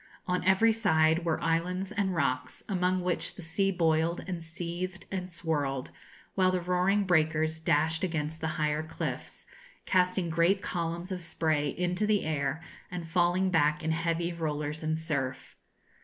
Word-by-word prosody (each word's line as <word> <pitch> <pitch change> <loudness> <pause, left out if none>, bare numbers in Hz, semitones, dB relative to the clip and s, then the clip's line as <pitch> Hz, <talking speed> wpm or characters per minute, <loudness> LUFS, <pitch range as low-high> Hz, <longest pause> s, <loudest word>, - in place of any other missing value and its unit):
On 180 0 0
every 190 +5 +5
side 165 -7 +3
were 165 -2 +1
islands 180 +4 0
and 200 -3 0
rocks, 130 -4 -1
among 185 -1 +1
which 180 -1 -1
the 185 - -8
sea 175 +5 +1
boiled, 165 -1 +1
and 175 -3 -4
seethed, 175 +3 -5
and 185 -1 -3
swirled, 145 -6 -2 0.4
while 185 -1 +3
the 185 0 +1
roaring 180 +3 +2
breakers 160 -3 +2
dashed 160 +1 +1
against 160 -3 -2
the 160 - 0
higher 150 0 +1
cliffs, 160 - -5 0.4
casting 180 -1 +2
great 170 +4 +3
columns 170 -1 -3
of 185 -1 -3
spray 155 -3 0
into 180 +3 0
the 210 -2 +2
air, 150 0 -1 0.3
and 175 -2 -5
falling 175 +2 +2
back 150 -2 +2
in 160 - 0
heavy 170 +1 0
rollers 150 -2 -3
and 155 0 0
surf. 140 -5 -3
170 Hz, 155 wpm, -29 LUFS, 160-180 Hz, 0.4 s, every